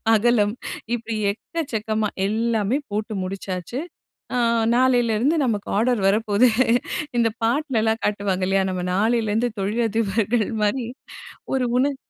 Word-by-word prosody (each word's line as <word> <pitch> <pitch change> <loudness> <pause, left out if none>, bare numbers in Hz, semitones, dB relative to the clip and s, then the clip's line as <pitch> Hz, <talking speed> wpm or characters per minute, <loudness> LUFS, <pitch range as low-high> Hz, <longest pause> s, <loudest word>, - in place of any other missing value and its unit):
அகலம் 215 -2 +3 0.4
இப்படி 230 -1 -4 0.2
எக்கச்சக்கமா 220 -6 -3 0.2
எல்லாமே 225 +2 0
போட்டு 215 +1 -3
முடிச்சாச்சு, 185 +4 -5 0.6
ஆ - - +1 0.4
நாலேளருந்து 245 +2 +3
நமக்கு 210 -4 -1
ஆர்டர் 240 0 +2
வரப்போகுது, 210 +3 +3 0.7
இந்த 230 - +3
பாட்டுலலாம் 230 -3 +1
காட்டுவாங்க 200 -3 0
இல்லையா? 195 0 +2
நம்ம 180 -1 -3
நாளிலேருந்து 225 +2 +1
தொழிலதிபர்கள் 220 +1 0 0.2
மாரி 230 +4 0 0.7
ஒரு 260 - +1
உணர்வு. 275 +1 +1
220 Hz, 105 wpm, -23 LUFS, 205-240 Hz, 0.7 s, அகலம்